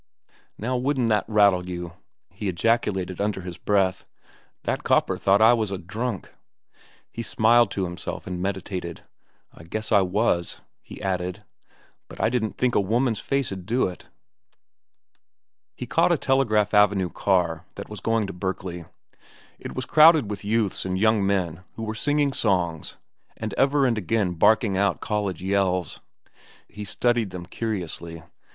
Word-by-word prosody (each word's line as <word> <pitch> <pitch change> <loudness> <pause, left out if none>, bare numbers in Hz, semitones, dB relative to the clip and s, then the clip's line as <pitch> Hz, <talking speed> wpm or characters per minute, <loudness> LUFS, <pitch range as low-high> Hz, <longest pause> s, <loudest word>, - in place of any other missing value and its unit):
"Now 125 +4 -2
wouldn't 130 -2 0
that 105 -2 +2
rattle 100 -4 +3
you?" 85 -1 -5 0.4
he 105 - -5
ejaculated 95 -1 0
under 100 -2 -1
his 90 -1 -8
breath. 95 -2 +1 0.6
"That - - -2
copper - - +2
thought 100 +2 +3
I 115 +2 +7
was 110 -3 0 0.2
drunk." 110 +1 -4 0.8
He 115 - -5
smiled 115 0 +3
to 95 - -2
himself 90 -1 -5
and 90 -1 -5
meditated. 95 -3 -4 0.5
"I - - -14
guess 110 +7 -5
I 100 -2 +6
was," 95 -2 0 0.2
he - - -11
added; 90 -2 -2 0.6
"but - - -12
I 110 - +2
didn't 115 -3 -2
think 125 -1 +1
a - - +3
woman's 115 +3 0
face'd 105 -10 -2
do 120 +3 +2
it." 90 - -10 1.7
He - - -6
caught - - +2
a - - +3
Telegraph 110 -7 +1
Avenue 105 -3 +3
car 90 -4 0
that 100 - -7
was 105 - -8
going 115 -1 0
to 95 - -6
Berkeley. 90 -2 -4 0.7
It - - -8
was 130 - -3
crowded 155 -7 +6
with 105 - -6
youths 105 -1 0
and 95 0 -2
young 110 0 +3
men 95 -3 -1
who 115 - -6
were 110 0 -3
singing 145 +4 +1
songs 90 -9 -1 0.4
and 110 -2 -4
ever 140 0 +3
and 115 -4 +1
again 100 -1 0
barking 105 +3 +3
out 100 0 +1
college 100 -5 -2
yells. 95 -2 0 0.7
He 105 +2 -8
studied 120 +1 0
them 90 -1 -7
curiously. 85 -6 -5
100 Hz, 150 wpm, -24 LUFS, 90-115 Hz, 1.7 s, I